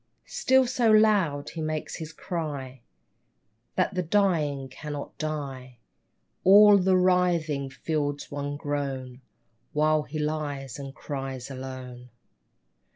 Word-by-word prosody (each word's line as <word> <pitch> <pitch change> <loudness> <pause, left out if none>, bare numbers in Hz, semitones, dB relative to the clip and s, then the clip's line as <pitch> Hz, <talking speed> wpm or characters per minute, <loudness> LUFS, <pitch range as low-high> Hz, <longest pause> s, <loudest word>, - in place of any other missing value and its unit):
Still 260 0 +3
so 240 -2 +1
loud 205 -10 +3
he 165 - -6
makes 155 0 -3
his 160 -1 -7
cry 145 -7 -5 0.9
That 185 +1 +1
the 185 - 0
dying 160 -7 +1
cannot 145 +2 -7
die; 135 -5 -5 0.7
All 205 +1 +8
the 185 0 +3
writhing 175 -6 +2
field's 145 0 -3
one 145 0 -3
groan 135 -3 -4 0.5
While 155 +1 +3
he 150 +1 -7
lies 145 -3 -3
and 135 -1 -8
cries 135 -2 -5
alone. 130 -2 -8
150 Hz, 110 wpm, -27 LUFS, 135-175 Hz, 0.9 s, All